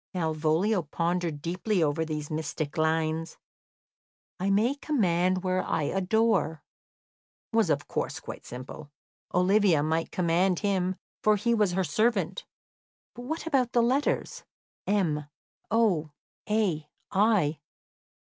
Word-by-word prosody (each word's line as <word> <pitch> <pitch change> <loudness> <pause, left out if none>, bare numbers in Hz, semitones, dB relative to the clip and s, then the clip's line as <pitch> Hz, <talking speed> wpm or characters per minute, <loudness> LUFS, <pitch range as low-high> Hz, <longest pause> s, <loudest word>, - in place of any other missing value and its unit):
Malvolio 160 +4 +1
pondered 165 -1 -2
deeply 180 +2 0
over 155 +2 +1
these 155 -2 -4
mystic 155 -1 -3
lines. 160 0 0 1.0
"I 190 +2 0
may 215 +7 +3
command 185 - +1
where 185 0 +1
I 160 - -1
adore" 190 -3 +1 0.9
was, - - +3
of - - 0
course, - - -3
quite - - -8
simple. 130 +4 -9 0.4
Olivia 180 -3 +3
might 160 +2 0
command 180 +1 +1
him, 190 -3 0 0.3
for 215 0 +4
he 235 +4 +1
was 210 -5 +2
her 190 +1 +1
servant. 220 +2 0 0.7
But 245 - -9
what 320 +5 -4
about 265 -6 +1
the 235 - +4
letters 265 +5 0 0.4
M, 170 -8 +1 0.4
O, 195 -9 +2 0.4
A, 185 -9 0 0.2
I? 190 -7 +2
180 Hz, 120 wpm, -28 LUFS, 160-215 Hz, 1.0 s, for